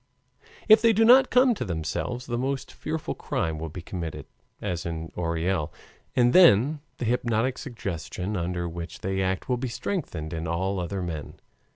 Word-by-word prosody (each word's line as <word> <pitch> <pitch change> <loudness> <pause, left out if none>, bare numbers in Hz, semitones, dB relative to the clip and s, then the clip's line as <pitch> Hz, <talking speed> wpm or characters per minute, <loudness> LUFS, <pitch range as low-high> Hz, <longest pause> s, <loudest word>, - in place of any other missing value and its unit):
If 215 0 +8
they 230 0 +5
do 225 +2 +4
not 260 +3 +7
come 250 0 +5
to 205 - -4
themselves, 90 +7 -3
the 120 - -3
most 135 +1 -2
fearful 155 0 -4
crime 80 -1 -2
will 80 0 -4
be 85 +2 -8
committed, 85 -3 -5 0.3
as 85 -1 -3
in 80 -1 -5
Orel, 85 -1 -1 0.4
and 120 -1 +4
then 150 - +6 0.2
the - - -3
hypnotic 120 +1 0
suggestion 100 - -4
under 85 -1 -2
which 85 0 -7
they 95 0 -1
act 95 0 -1
will 125 - +1
be 130 +2 -3
strengthened 115 - -4
in 80 0 -3
all 95 +4 -1
other 90 +2 -3
men. 80 -4 -5
95 Hz, 170 wpm, -26 LUFS, 85-130 Hz, 0.4 s, If